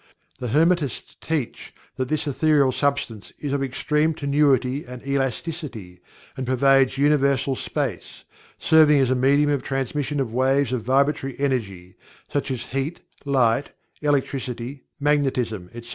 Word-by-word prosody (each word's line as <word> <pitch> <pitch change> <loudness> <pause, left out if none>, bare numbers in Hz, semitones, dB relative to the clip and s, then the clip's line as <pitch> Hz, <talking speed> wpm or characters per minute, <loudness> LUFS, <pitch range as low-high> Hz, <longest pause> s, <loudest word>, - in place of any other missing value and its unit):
The 125 - -3
Hermetists 155 +1 +1
teach 155 -7 -4 0.2
that 130 -1 -2
this 155 -1 0
Ethereal 145 -1 +3
Substance 130 -5 -2
is 145 -2 -4
of 140 - 0
extreme 150 +4 0
tenuity 140 -2 +1
and 125 +1 -10
elasticity, 135 - -3 0.3
and 130 -1 -5
pervades 135 +1 +3
universal 140 -2 +2
space, - - -4 0.3
serving 155 -2 +5
as 130 -2 +2
a - - +3
medium 140 +3 +3
of 140 -2 0
transmission 140 +2 -2
of 120 -4 -2
waves 130 +1 +2
of 125 - -1
vibratory 135 +2 0
energy, 100 -10 -2 0.4
such 145 0 -1
as 125 -3 -3
heat, 135 +5 -4 0.2
light, 130 -2 +1 0.3
electricity, 135 -3 -2
magnetism, 130 -10 0
etc. 120 0 -10
135 Hz, 130 wpm, -23 LUFS, 125-145 Hz, 0.4 s, serving